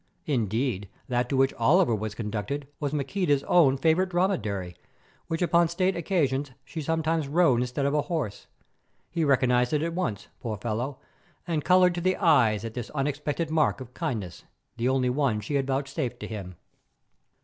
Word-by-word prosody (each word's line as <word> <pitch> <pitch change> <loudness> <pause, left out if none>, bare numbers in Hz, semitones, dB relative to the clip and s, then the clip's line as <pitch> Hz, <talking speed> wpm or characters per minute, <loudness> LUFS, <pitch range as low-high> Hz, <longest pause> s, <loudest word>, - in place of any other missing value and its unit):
Indeed, 115 - -1 0.2
that 125 0 0
to 135 - 0
which 135 0 +3
Oliver 155 +3 +4
was 110 0 -3
conducted 110 +6 -4
was 145 -2 -2
Maqueda's 145 0 0
own 145 -7 +4
favourite 165 +6 +2
dromedary, 105 - -1 0.5
which 165 +2 -1
upon 170 -1 +4
state 185 +3 0
occasions 145 -6 0 0.2
she 160 - -6
sometimes 160 0 0
rode 145 -5 +3
instead 125 +3 -1
of 140 - +1
a 150 - +3
horse. 145 - -4 0.6
He 165 -1 0
recognized 125 -2 +3
it 150 0 +1
at 165 0 -2
once, 110 - -3
poor 110 -3 -4
fellow, 120 +6 -3 0.5
and 160 -4 -1
coloured 180 0 +5
to 175 - -3
the 185 +1 +1
eyes 115 - +3
at 115 - -5
this 120 -2 -5
unexpected 145 +3 -2
mark 155 -3 +2
of 125 -1 -10
kindness, 105 -11 -4 0.3
the 120 +2 0
only 130 -1 +2
one 130 -5 +1
she 105 +7 -5
had 135 -1 +1
vouchsafed 135 -2 -2
to - - -5
him. 95 -5 -7
140 Hz, 170 wpm, -27 LUFS, 120-165 Hz, 0.6 s, coloured